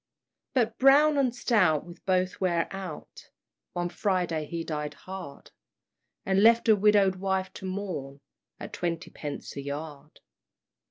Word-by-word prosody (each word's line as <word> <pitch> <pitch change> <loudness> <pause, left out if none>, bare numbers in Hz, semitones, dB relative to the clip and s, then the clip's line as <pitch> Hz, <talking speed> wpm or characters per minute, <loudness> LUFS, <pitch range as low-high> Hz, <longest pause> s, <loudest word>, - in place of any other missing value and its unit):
But 230 -3 +1
Brown 285 +2 +6
and 260 -3 +2
stout 185 - +2
will 175 - -10
both 185 0 0
wear 170 -3 +1
out 185 -6 -9 0.4
One 175 0 -2
Friday 175 -4 -1
he 170 +1 -4
died 150 -2 -4
hard, 180 -3 -9 0.7
And 195 0 +2
left 230 +2 +5
a 220 - +7
widow'd 200 -2 +4
wife 190 0 -1
to 190 - -6
mourn, 185 -8 -5 0.4
At - - -8
twenty 170 -1 -3
pence 145 -2 -7
a 140 - -4
yard. 145 +1 -7
185 Hz, 140 wpm, -28 LUFS, 160-200 Hz, 0.7 s, a